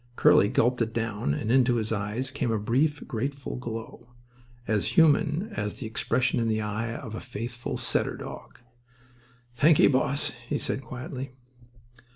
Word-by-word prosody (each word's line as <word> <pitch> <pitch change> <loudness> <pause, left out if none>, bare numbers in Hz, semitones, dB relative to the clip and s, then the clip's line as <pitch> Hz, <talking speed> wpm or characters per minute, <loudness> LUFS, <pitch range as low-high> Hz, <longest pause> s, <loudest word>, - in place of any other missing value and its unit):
Curly 100 - +5
gulped 125 +1 +2
it 115 0 -1
down; 105 -10 -1
and 110 +6 -2
into 125 -1 +4
his 110 -1 -1
eyes 110 +5 -2
came 130 -3 -1
a 110 - +1
brief, 135 +8 0
grateful 135 +2 -3
glow—as 120 - -6
human 160 +4 +4
as 105 0 -3
the 125 - -6
expression 120 +3 0
in 115 - +1
the 110 -1 +1
eye 110 +2 -3
of 115 -4 -7
a 110 - -4
faithful 120 +2 -5
setter - - 0
dog. - - -9 1.0
"Thanky, 150 +5 +6
boss," 140 +2 +1 0.2
he 145 - +1
said, 135 - -2
quietly. 130 0 -7
120 Hz, 150 wpm, -27 LUFS, 110-130 Hz, 1.0 s, Thanky